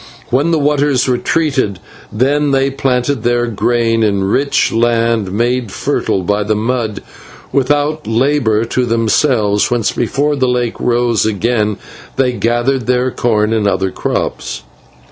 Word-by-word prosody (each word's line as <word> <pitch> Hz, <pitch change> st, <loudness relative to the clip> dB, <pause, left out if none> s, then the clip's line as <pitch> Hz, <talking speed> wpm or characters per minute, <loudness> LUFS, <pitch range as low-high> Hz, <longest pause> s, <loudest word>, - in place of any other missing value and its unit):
When 140 Hz, +6 st, +2 dB
the 165 Hz, -, +2 dB
waters 145 Hz, -3 st, +1 dB
retreated, 130 Hz, -, 0 dB, 0.3 s
then 140 Hz, +6 st, +1 dB
they 135 Hz, 0 st, +1 dB
planted 135 Hz, -1 st, -1 dB
their 120 Hz, +1 st, +1 dB
grain 115 Hz, 0 st, 0 dB
in 100 Hz, -3 st, +1 dB
rich 135 Hz, +9 st, +1 dB
land 115 Hz, -3 st, +1 dB
made 120 Hz, +1 st, -1 dB
fertile 95 Hz, 0 st, -1 dB
by 105 Hz, +3 st, 0 dB
the 105 Hz, +1 st, 0 dB
mud, 110 Hz, -1 st, -2 dB, 0.5 s
without 145 Hz, +3 st, 0 dB
labour 115 Hz, -2 st, +1 dB
to 125 Hz, +2 st, -1 dB
themselves, 115 Hz, -2 st, +1 dB
whence, 120 Hz, -3 st, 0 dB
before 145 Hz, +5 st, 0 dB
the 130 Hz, -2 st, 0 dB
lake 125 Hz, -2 st, -1 dB
rose 120 Hz, -2 st, +1 dB
again, 105 Hz, 0 st, 0 dB, 0.4 s
they 130 Hz, -2 st, +1 dB
gathered 120 Hz, +2 st, 0 dB
their 125 Hz, 0 st, +1 dB
corn 110 Hz, -3 st, 0 dB
and 110 Hz, -2 st, +1 dB
other 95 Hz, -1 st, 0 dB
crops. -, -, -3 dB
120 Hz, 135 wpm, -15 LUFS, 110-135 Hz, 0.5 s, When